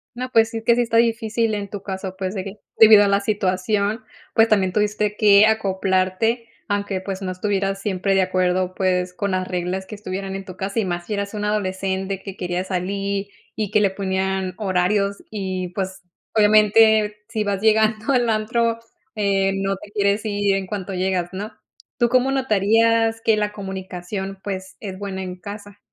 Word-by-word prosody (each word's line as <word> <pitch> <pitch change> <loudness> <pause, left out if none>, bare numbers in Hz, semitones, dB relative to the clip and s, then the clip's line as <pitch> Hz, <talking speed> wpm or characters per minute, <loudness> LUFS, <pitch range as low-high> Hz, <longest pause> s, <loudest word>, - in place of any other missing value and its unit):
No, 255 +1 -4
pues, 225 0 +4
sí, 225 - -4
es - - -14
que 235 +1 +4
sí - - +4
está 230 -1 -1
difícil, 230 -1 +2
en 200 -1 -4
tu 200 -1 -7
caso, 190 -1 -5
pues, 190 0 -3
de 190 -1 -4
que, 200 +2 -9 0.2
debido 215 -2 +9
a 200 - +2
la 200 - +3
situación, 205 +1 0 0.3
pues, 225 0 +5
también 195 -4 +2
tuviste 210 0 0
que 205 0 +7
acoplarte, 195 +2 +1 0.2
aunque, 200 -2 -1
pues, 195 0 -5
no 185 -1 -3
estuvieras 195 0 -1
siempre 195 -1 0
de 190 - +4
acuerdo, 185 0 0
pues, 180 -1 0
con 200 +1 -2
las 185 0 0
reglas 180 +1 -3
que 210 - -10
estuvieran 195 -1 -5
en 195 - -8
tu 185 - -9
casa, 195 +4 -3
y 210 - 0
más 175 -1 -3
si 215 - -4
eras 200 +1 -3
una 210 0 -2
adolescente 190 -1 -2
que 195 -1 -8
quería 180 0 -2
salir 195 +2 -2 0.3
y 210 -3 -2
que 210 - +3
le 200 - +4
ponían 190 -1 -2
horarios 200 0 0
y, 185 -3 -3
pues, 190 -1 -4 0.3
obviamente, 215 0 +5
si 220 -2 -2
vas 200 -1 -2
llegando 220 +2 +2
al 245 -2 +2
antro, 230 +1 0 0.4
eh, 195 -2 +1
no 195 0 -1
te 200 +1 -13
quieres 200 0 +1
ir 205 -2 +1
en 195 -1 -2
cuanto 195 0 -5
llegas, 185 -1 0
¿no? 205 +4 -5 0.5
¿Tú 240 - +3
cómo 255 +2 +2
notarías 225 -2 +2
que 225 -1 +3
la 210 0 -1
comunicación, 190 0 -6
pues, 190 -1 -5
es 190 -3 -6
buena 190 -1 -5
en 180 0 -6
casa? 205 0 -9
200 Hz, 185 wpm, -22 LUFS, 190-215 Hz, 0.5 s, debido